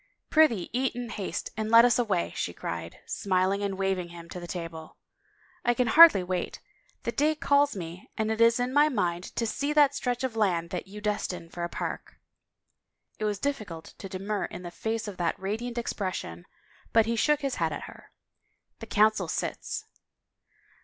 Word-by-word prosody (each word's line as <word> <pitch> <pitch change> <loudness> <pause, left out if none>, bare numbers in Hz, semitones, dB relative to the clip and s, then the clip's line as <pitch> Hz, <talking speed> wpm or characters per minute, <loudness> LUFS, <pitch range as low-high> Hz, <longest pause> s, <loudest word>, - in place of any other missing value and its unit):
" - - -54
Prithee 270 - +4
eat 255 0 0
in 245 -1 -5
haste 200 -4 -4
and 220 -1 -2
let 230 +1 +8
us 245 0 +3
away," 200 -8 0
she - - -2
cried, 85 0 -5
smil 185 -1 +1
ing 200 - -2
and 200 -2 -2
waving 190 -2 -1
him 170 -1 -11
to 180 - -6
the 175 - -8
table. 165 -3 -7 0.3
" - - -38 0.3
I 240 0 +2
can 250 - +2
hardly 300 - +8
wait. 180 -1 -3 0.4
The - - -1
day 305 +2 +2
calls 285 -2 +3
me 175 -1 -7
and 220 0 0
it 220 +1 -1
is 230 +1 +5
in 250 +1 -1
my 295 +2 +5
mind 180 - -1
to 230 - 0
see 285 +6 -1
that 290 -2 +5
stretch 250 -3 -2
of 255 -3 -2
land 175 -6 +1
that 180 +1 -4
you 210 +2 -9
destine 180 -5 -2
for 175 - -5
a 170 - -2
park." - - -5 1.0
It 215 - -1
was 210 -1 0
difficult 210 - -4
to 195 - -7
demur 195 +2 -2
in 175 - -8
the 175 - -6
face 220 +4 -3
of 200 -3 -7
that 170 -2 0
radiant 225 +5 -3
expectation 185 - -4 0.5
but 225 -1 +5
he 230 +1 0
shook 300 +6 +2
his 275 -3 -2
head - - +2
at - - -5
her. - - -12 0.3
" - - -48
The 225 - -8
Coun 215 +1 +4
cil - - -3
sits." - - -3
210 Hz, 200 wpm, -28 LUFS, 180-245 Hz, 1.0 s, let